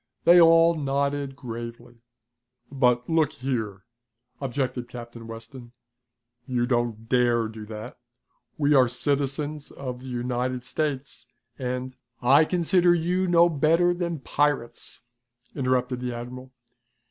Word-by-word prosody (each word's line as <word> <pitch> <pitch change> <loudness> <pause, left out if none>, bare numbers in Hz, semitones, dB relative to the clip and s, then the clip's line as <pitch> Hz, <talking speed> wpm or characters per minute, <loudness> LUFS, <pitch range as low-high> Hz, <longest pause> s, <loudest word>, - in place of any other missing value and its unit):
They 175 +1 +7
all 165 0 +6
nodded 140 -2 -1
gravely. 120 -2 -8 0.7
"But 125 -3 +2
look 160 -3 +2
here!" 110 -7 -3 0.6
objected 130 -2 -2
Captain 120 -2 -9
Weston. 120 +2 -10 0.7
"You 125 -2 0
don't 120 -3 -1
dare 120 -2 +2
do 110 -1 -9
that! 110 +2 -8 0.6
We 150 0 +3
are 130 -3 +6
citizens 145 +3 -1
of 125 -2 -7
the 130 - -10
United 125 0 -2
States, 135 -4 -3 0.3
and 125 0 -4 0.2
" - - -46 0.2
"I 155 - +5
consider 175 +1 +3
you 180 +3 0
no 170 -1 +5
better 165 +3 +3
than 170 -4 -3
pirates," 135 -5 -1 0.5
interrupted 130 -2 0
the 125 -1 -4
admiral. 125 +2 -8
130 Hz, 120 wpm, -25 LUFS, 120-150 Hz, 0.7 s, They